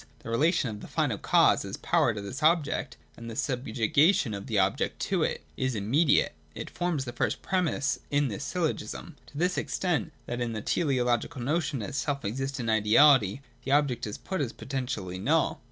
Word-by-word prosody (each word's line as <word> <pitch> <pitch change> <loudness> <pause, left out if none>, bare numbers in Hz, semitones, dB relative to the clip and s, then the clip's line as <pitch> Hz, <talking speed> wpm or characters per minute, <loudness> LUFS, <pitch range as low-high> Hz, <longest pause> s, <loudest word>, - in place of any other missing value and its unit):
The 115 - -6
relation 155 +4 +2
of 105 - -7
the - - -9
final - - -1
cause - - +4
as - - -6
power 120 - +2
to 105 - -4
this 125 +9 -6
object, 155 -1 +1 0.2
and 115 0 -8
the 115 - -7
subjuga 130 - +2
tion 115 -6 -1
of 100 0 -6
the 110 - -1
object 95 0 +1
to - - 0
it, - - -1
is 130 -2 -1
immediate 135 +10 +2 0.2
(it - - -6
forms 170 -6 -1
the 120 - -6
first - - -1
premiss 180 -7 0
in 145 0 +2
the 105 -5 -4
syllogism) - - -3
to 145 - -12
this 180 +3 +1
extent, 175 -3 -1
that 120 0 -4
in 120 -1 -2
the 110 - -4
teleological 125 -3 0
notion 145 -3 -1
as 100 - -4
the - - -9
self 140 -1 -2
existent 135 +3 -3
ideality 110 +1 +5 0.2
the 135 - 0
object 140 -6 +1
is 105 - -5
put 190 -3 -4
as 130 -5 -2
potentially 120 -9 -4
null. 150 +10 +1
130 Hz, 190 wpm, -28 LUFS, 115-150 Hz, 0.2 s, ideality